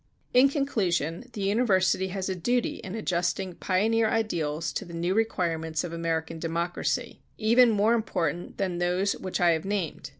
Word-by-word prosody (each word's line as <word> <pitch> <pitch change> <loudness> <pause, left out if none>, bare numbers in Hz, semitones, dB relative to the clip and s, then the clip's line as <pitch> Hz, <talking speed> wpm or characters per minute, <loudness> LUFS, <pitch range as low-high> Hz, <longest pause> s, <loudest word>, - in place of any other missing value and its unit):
In 255 +2 +6
conclusion, 210 - -1
the 205 - -4
university 195 -3 +2
has 190 0 -3
a 190 - -1
duty 240 +7 0
in 190 +2 -7
adjusting 180 -2 -1
pioneer 220 +6 +1
ideals 165 -9 -1
to - - -3
the 170 -3 -9
new 175 +2 0
requirements 165 -7 0
of 175 -2 -5
American 165 -1 -2
democracy, 170 +1 -2 0.2
even 235 +3 +5
more 215 +1 +3
important 180 -6 -2
than 185 -3 -1
those 180 +3 +1
which 185 -1 -4
I 175 -1 +5
have 160 -1 0
named. 190 -8 -3
185 Hz, 160 wpm, -27 LUFS, 170-215 Hz, 0.2 s, In